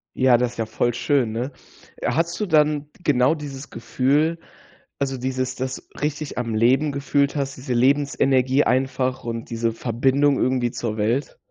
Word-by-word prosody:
Ja, 130 -2 +5
das 125 0 -1
ist - - -16
ja 115 - -1
voll 120 +2 0
schön, 130 -3 +1
ne? 120 +5 -3 0.5
Äh, - - -1
hattest 170 +2 -1
du 210 - 0
dann 150 -3 +3
d - - -24
genau 130 +1 +3
dieses 140 -2 -8
Gefühl, 145 +8 0 0.6
also, 135 -1 -1
dieses 130 0 -2
das 130 0 -5
richtig 150 -1 -3
am 115 -2 -2
Leben 130 +7 +3
gefühlt 140 0 0
hast, 140 -2 -2
diese 130 0 -4
Lebensenergie 135 +1 +3
einfach 130 0 0
und 115 -1 -5
diese 115 0 -1
Verbindung 130 +5 +1
irgendwie 125 -1 +1
zur 110 -3 -3
Welt? 115 +7 -1
130 Hz, 165 wpm, -22 LUFS, 120-145 Hz, 0.6 s, Ja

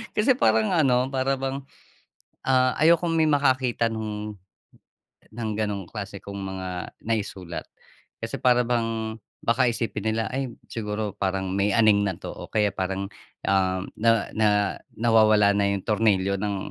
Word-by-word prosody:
Kasi 245 +4 +3
parang 110 - +3
ano, 130 -6 +3
para 135 0 +1
bang, 135 +1 -4 0.8
ah, 130 -1 +4
ayokong 170 +1 +4
may 160 -1 +3
makakita 130 -5 +2
nung 105 -1 -4 1.0
ng 115 -1 -3
gano'ng 105 -4 -2
klase 100 -2 -6
kong 100 0 -8
mga 95 -1 -5 0.4
naisulat. 100 -6 -3 0.6
Kasi - - -4
para 125 -1 +5
bang 115 -2 -1 0.3
baka 120 +2 +3
isipin 110 -2 -2
nila, 110 +1 0
ay 135 -1 -2 0.2
siguro 105 -2 -3
parang 95 -1 -2
may 100 +1 +1
aning 110 -3 +5
na 95 -4 -1
'to - - -7
o - - -9
kaya 105 -2 +1
parang, 95 +1 -2 0.4
ah, 95 -1 +2 0.2
na 115 -1 +2
na 110 -1 +3 0.5
nawawala 110 -3 +5
na 100 0 +2
yung 100 -1 -2
tornilyo 100 -3 +2
ng 105 -1 -1
110 Hz, 145 wpm, -25 LUFS, 100-125 Hz, 1.0 s, para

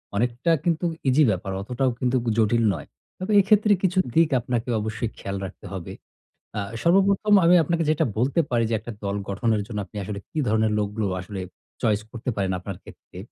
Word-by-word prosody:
অনেকটা 120 +8 +1
কিন্তু 170 0 0 0.2
ইজি 140 +4 +5
ব্যাপার, 95 0 -3
অতটাও 125 +5 0
কিন্তু 125 0 +1 0.2
জটিল 115 +1 +3
নয়। 80 - -7 0.3
তবে 185 +3 -4
এক্ষেত্রে 210 +2 +4
কিছু 185 0 +1 0.2
দিক 165 -1 +5
আপনাকে 120 0 -2
অবশ্যই 110 +2 -3
খেয়াল 100 0 -4
রাখতে 95 - -10
হবে। 95 -3 -6 0.6
আ - - 0 0.2
সর্বপ্রথম 195 +4 +3
আমি 175 +2 +7
আপনাকে 170 +2 0
যেটা 155 +1 +2
বলতে 130 +8 +1
পারি 120 -2 +2
যে - - -1
একটা 115 +2 -8
দল 100 0 -1
গঠনের 105 +2 0
জন্য 105 -2 -4
আপনি 105 - -11
আসলে 100 +1 -5
কি - - -9
ধরনের 110 0 +2
লোকগুলো 105 +1 -2 0.2
আসলে 95 +1 -7 0.4
চয়েস 110 -3 +2
করতে 120 +1 -5
পারেন 95 -2 0
আপনার 95 0 -7
ক্ষেত্রে। - - -15
115 Hz, 180 wpm, -24 LUFS, 105-160 Hz, 0.6 s, আমি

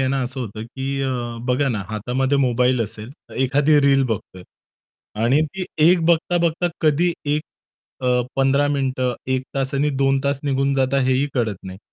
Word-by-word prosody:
आहे 130 - +1
ना, 135 0 0
असं 130 +2 -4
होतं 110 -3 -6
की 135 +3 -4
अ, 135 - 0 0.4
बघा 130 +2 +2
ना 110 -5 -2
हातामध्ये 125 +6 -1
मोबाईल 125 -1 +2
असेल, 110 +1 -8
तर 140 - -17
एखादी 145 +3 +3
रील 140 -1 +4
बघतोय. 105 -6 -5 0.8
आणि 130 +6 +3
ती 185 +5 -5 0.2
1 180 0 +4
बघता-बघता 170 0 +2
कधी 160 +3 +2
एक 150 +1 0 0.6
अ, 125 -1 +2 0.2
15 135 +1 +3
मिनिटं 130 -3 -1 0.2
1 130 0 0
तास 135 0 -2
आणि 145 +2 +1
2 135 0 +2
तास 140 -1 0
निघून 135 0 +1
जाता 135 0 +1
हेही 130 +2 +2
कळत 115 -6 0
नाही. 95 0 -9
135 Hz, 170 wpm, -21 LUFS, 125-145 Hz, 0.8 s, रील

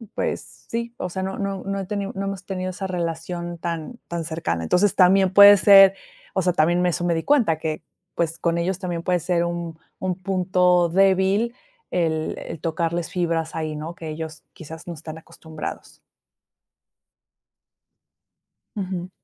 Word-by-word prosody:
pues - - -1 0.3
sí, 235 0 -3
o 180 - -4
sea, 190 +2 -4
no 190 0 -4
no 195 -2 -3
no 195 0 -2
he 195 - -4
ten 200 0 -3
no 195 +1 -3
hemos 195 -1 -5
tenido 185 -1 -3
esa 190 +1 -5
relación 170 0 -4
tan 170 +7 -5
tan 170 -1 -3
cercana. 155 - -2
Entonces 180 - +2
también 190 0 +5
puede 200 +1 +10
ser, 195 0 +8 0.4
o 190 - +1
sea, 180 0 +1
también 175 +2 +2
eso 175 0 0
me 175 - +2
di 165 - -2
cuenta 240 - +3
que 155 0 -3 0.3
pues 165 -1 -1
con 170 0 0
ellos 180 +2 -1
también 175 -3 -4
puede 180 0 +1
ser 170 0 0
un 170 -1 -4 0.2
un 185 -1 -1
punto 180 -1 +2
débil 195 +5 +2 0.4
el 160 -3 -1
el 165 - -8
tocarles 170 +1 -2
fibras 165 -3 -1
ahí, 155 -1 -3
¿no?, 155 +3 -6
que 165 - -8
ellos 160 0 -7
quizás 160 +1 -10
no 175 - -4
están 160 0 -8
acostumbrados. 160 -1 -9 2.8
Ujú. 185 -3 -4
175 Hz, 160 wpm, -23 LUFS, 165-190 Hz, 2.8 s, puede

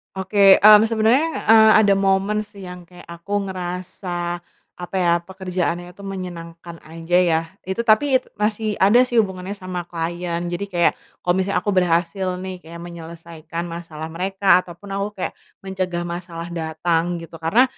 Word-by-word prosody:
Oke, 195 0 +5
mmm, 210 0 +8
sebenernya, 240 +9 +2
eee, 220 -1 +7
ada 200 -2 +4
momen 195 +2 +1
sih 200 -3 -12
yang 180 0 -9
kayak 175 +1 -16
aku 195 +4 -3
ngerasa, 175 -1 -5 0.3
apa 180 +2 -8
ya, 175 -2 +3
pekerjaannya 180 -1 -4
tuh 200 - -13
menyenangkan 170 -3 -8
aja 165 +2 -3 0.2
ya, 160 0 +2 0.2
itu 190 +3 -4
tapi 240 +4 +3 0.2
masih 210 0 -1
ada 205 +5 +5
sih 245 - -4
hubungannya 190 0 -6
sama 185 -3 -6
klien. 170 0 -3
Jadi 200 +3 -3
kayak 175 -3 +1 0.2
kalo 180 - +2
misalnya 190 +1 0
aku 205 - 0
berhasil 180 0 +1 0.2
nih 185 -1 -6
kayak 170 0 -11
menyelesaikan 170 -1 -8
masalah 160 -2 -7
mereka, 190 +1 +3
ataupun 185 +3 -10
aku 200 +1 -1 0.2
kayak - - -3 0.3
mencegah 185 -2 -3
masalah 170 -1 -6
datang 165 +1 -1
gitu 165 -1 -9
karena, 165 +10 +4
180 Hz, 150 wpm, -21 LUFS, 170-195 Hz, 0.3 s, mmm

